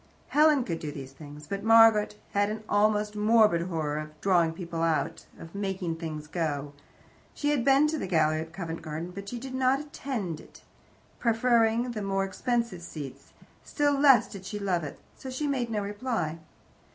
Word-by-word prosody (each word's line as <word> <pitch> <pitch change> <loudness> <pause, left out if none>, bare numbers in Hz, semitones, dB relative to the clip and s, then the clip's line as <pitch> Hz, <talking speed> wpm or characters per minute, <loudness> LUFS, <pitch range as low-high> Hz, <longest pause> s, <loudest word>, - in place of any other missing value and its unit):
Helen 300 -2 +4
could 170 -7 -3
do 150 - -5
these 135 -2 -8
things. 145 +1 -11
But 195 +6 -4
Margaret 225 -2 +6 0.2
had 205 0 +2
an 215 0 -5
almost 210 0 +2
morbid 210 -4 +4
horror 155 -4 -2
of 155 0 -9
"drawing 175 -4 +3
people 170 -1 -5
out," 165 -1 -1
of 165 - -11
"making 190 -4 -3
things 155 -2 -5
go." 150 -3 -3 0.6
She 290 0 0
had 280 -5 +1
been 275 +2 +5
to 305 0 -1
the - - -3
gallery 155 -3 +2
at 160 0 -8
Covent 165 -2 -5
Garden, 160 +2 -5
but 200 +2 -7
she 245 - -5
did 260 +2 -7
not 260 +1 +2
"attend" 255 - -4
it, - - -16 0.6
preferring 235 0 +2
the 215 -3 -4
more 195 -1 0
expensive 235 -1 -2
seats; 150 -5 -9 0.3
still 290 -1 +1
less 275 -2 +6
did 195 -3 -10
she 190 +2 -5
love 190 -4 -1
it. 145 - -6 0.2
So 265 - -7
she 260 +4 -3
made 260 -5 -1
no 210 -2 -1
reply. 205 -6 -3
200 Hz, 180 wpm, -28 LUFS, 165-235 Hz, 0.6 s, Margaret